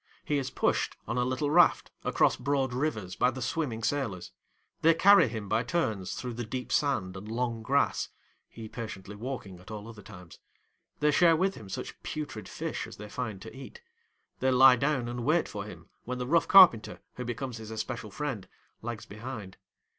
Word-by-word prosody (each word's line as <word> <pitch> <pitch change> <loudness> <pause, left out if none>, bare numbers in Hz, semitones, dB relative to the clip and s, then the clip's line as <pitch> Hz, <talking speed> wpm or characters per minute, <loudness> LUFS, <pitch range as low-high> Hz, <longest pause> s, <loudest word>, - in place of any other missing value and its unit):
He 145 -1 +1
is 130 - -3
pushed, - - 0
on 125 - -1
a - - +2
little 130 +4 -1
raft, 175 +1 +4
across - - +3
broad 135 -1 0
rivers 110 -9 -2
by 125 - +3
the 130 +1 -6
swimming 125 -4 -2
sailors; 110 -11 -2 0.5
they 165 +1 +5
carry 200 -1 +7
him 110 -3 -5
by 110 +3 +2
turns 110 - -1
through 125 -1 -5
the 120 +1 -4
deep 125 +3 -5
sand 110 -11 +1
and 95 +2 -8
long 115 -1 -2
grass 140 +5 +1 0.4
(he 115 -1 -9
patiently 105 -3 -7
walking 105 -5 -6
at 90 - -15
all 105 -1 -7
other 110 -2 -10
times); 90 -4 -13 0.6
they 150 0 +4
share 165 +1 +5
with 190 +4 +1
him 105 - -11
such - - -6
putrid 145 -8 -5
fish - - -4
as - - -11
they 105 +1 -9
find 110 -5 -5
to 110 - -10
eat; 140 - -11 0.6
they 130 - +2
lie 130 0 +8
down 135 -1 0
and 120 0 -4
wait 155 +6 +2
for 100 -2 -6
him 105 - -11 0.2
when 125 +1 -3
the 125 - -3
rough 165 +6 +3
carpenter, 175 - +7 0.2
who 125 - -3
becomes 120 0 -4
his 110 -1 -9
especial 110 0 -4
friend, 125 -2 -4 0.3
lags 115 -1 -5
behind. 105 -3 -8
120 Hz, 190 wpm, -29 LUFS, 110-140 Hz, 0.6 s, lie